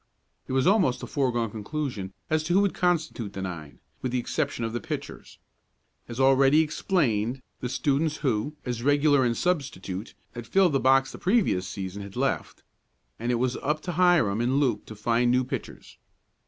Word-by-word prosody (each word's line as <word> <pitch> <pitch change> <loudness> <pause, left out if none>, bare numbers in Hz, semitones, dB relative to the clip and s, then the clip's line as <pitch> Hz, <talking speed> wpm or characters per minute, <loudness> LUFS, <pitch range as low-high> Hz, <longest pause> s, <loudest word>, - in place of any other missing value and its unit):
It - - -4
was 130 0 +2
almost 185 - +3
a - - -2
foregone 120 -5 -1
conclusion 110 -3 -4 0.2
as 155 0 +1
to 175 - 0
who 195 - +5
would 200 -2 +1
constitute 160 - -1
the 95 - -5
nine, 85 -6 -7 0.2
with 130 - -2
the 125 - 0
exception 130 -1 -2
of 115 - -4
the 120 - -3
pitchers. - - -7 0.7
As 120 +1 -6
already 135 +3 +5
explained, 130 - 0 0.2
the 125 - -3
students 150 +4 0
who, 130 +4 0
as 120 -2 -3
regular 145 +1 +3
and 120 -2 +1
substitute, 120 - -2 0.2
had 120 -1 -8
filled 190 -1 +3
the 135 - +3
box 135 +1 +3
the - - -10
previous 180 - +1
season 95 +1 -6
had 100 -1 -9
left, - - -2 0.6
and 120 +2 -1
it - - +2
was 125 +1 0
up 150 +2 -1
to 180 - -3
Hiram 170 - +3
and 130 +4 +2
Luke 120 -7 0
to 110 - -9
find 120 +3 +1
new 125 +1 +3
pitchers. 130 - -7
130 Hz, 180 wpm, -26 LUFS, 115-150 Hz, 0.7 s, who